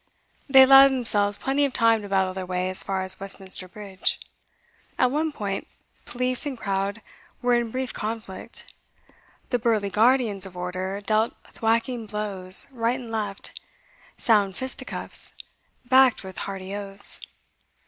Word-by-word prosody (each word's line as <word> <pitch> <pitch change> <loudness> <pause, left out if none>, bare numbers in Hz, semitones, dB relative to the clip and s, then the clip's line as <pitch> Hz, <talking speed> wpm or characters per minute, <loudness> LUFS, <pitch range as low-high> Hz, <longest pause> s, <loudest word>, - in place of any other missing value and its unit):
They 265 -1 +9
allowed 270 +1 +8
themselves 205 -6 +2
plenty 275 +2 0
of 280 -2 0
time 230 -2 +3
to 205 - -9
battle 190 -1 +1
their 190 0 -5
way 180 0 -2
as 185 - +1
far 190 -1 -2
as 190 0 +7
Westminster 195 -1 +1
Bridge. 195 0 -4 0.8
At 255 -1 +2
one 310 +3 -1
point 200 -7 -4 0.4
police 250 +3 -1
and 270 -3 -5
crowd 200 +1 -3 0.4
were 245 0 +2
in 240 -1 +1
brief 255 +2 -4
conflict; 215 -3 -6 0.8
the 245 - +1
burly 220 -4 0
guardians 220 -2 +2
of 180 -1 -13
order 185 +2 -4
dealt 215 +2 0
thwacking 230 +1 -2
blows, 195 -3 +1
right 240 0 -1
and 235 -3 -9
left, 210 -3 -5 0.6
sound 205 -4 +2
fisticuffs, 260 0 -1 0.5
backed 260 -2 +4
with 190 -1 -8
hearty 195 0 -6
oaths. 200 -1 0
215 Hz, 140 wpm, -24 LUFS, 195-245 Hz, 0.8 s, They